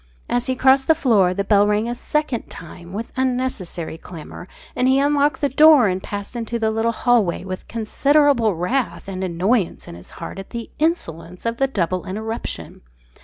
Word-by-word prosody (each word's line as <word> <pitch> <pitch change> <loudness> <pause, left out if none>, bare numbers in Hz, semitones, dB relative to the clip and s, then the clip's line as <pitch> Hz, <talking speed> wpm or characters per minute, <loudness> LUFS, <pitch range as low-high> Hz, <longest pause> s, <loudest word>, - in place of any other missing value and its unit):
As 245 0 0
he 260 - 0
crossed 265 +1 +4
the 320 - +5
floor, 220 - +3
the 200 +2 -1
bell 205 0 +4
rang 210 +2 +1
a 240 - -2
second 275 -1 -2
time, 170 +1 -11
with 220 +4 -5
unnecessary 250 -11 -2
clamour, 175 +1 -10 0.3
and 250 - +1
he 265 +1 +4
unlocked 285 0 +2
the 285 - +2
door 300 -3 +6
and 185 0 -1
passed 205 +4 -6
into 235 0 -3
the 220 -1 0
little 225 +1 0
hallway 230 -7 +1
with 185 0 -7
considerable 235 - +2
wrath 220 +8 -2
and 190 -1 -4
annoyance 185 +3 0
in - - -8
his 85 +1 -11
heart 170 - -7
at 195 - -9
the 235 -1 -7
insolence 180 - -2
of 230 0 -1
the 270 - +2
double 185 -6 -2
interruption. 220 +4 -5
225 Hz, 180 wpm, -21 LUFS, 185-260 Hz, 0.3 s, door